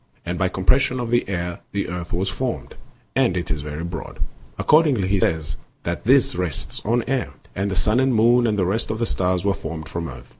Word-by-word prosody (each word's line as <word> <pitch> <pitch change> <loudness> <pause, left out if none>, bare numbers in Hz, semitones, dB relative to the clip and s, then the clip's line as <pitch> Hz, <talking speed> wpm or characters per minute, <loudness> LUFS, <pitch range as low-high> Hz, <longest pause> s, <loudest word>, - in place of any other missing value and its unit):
And 90 +1 -3
by 95 -1 +2
compres 95 +8 +3
sion 130 -1 0
of 120 -1 -3
the 120 -4 +2
air 85 -2 -2
the 100 0 -1
earth 90 -1 -5
was 90 +2 0
formed, 125 +4 -3 0.4
and 90 - +3
it 85 -2 -2
is 75 -1 -1
very 75 +2 -5
broad; 85 -1 -6 0.4
accordingly 150 - +4
he 100 0 +2
says 80 -4 0 0.3
that 85 +3 -3
this 130 +2 +5
rests 85 -5 -2
on 115 +2 +2
air; 130 - -1 0.2
and 100 +1 0
the 95 - -2
sun 105 +6 +3
and 130 0 +3
the - - +1
moon 120 +2 +5
and 105 -2 +1
the 95 - +2
rest 105 +6 0
of 110 - -1
the 115 - 0
stars 90 -3 0
were 100 - +3
formed 80 -3 -6
from 85 -1 -4
earth. 60 -2 -10
95 Hz, 230 wpm, -23 LUFS, 85-115 Hz, 0.4 s, this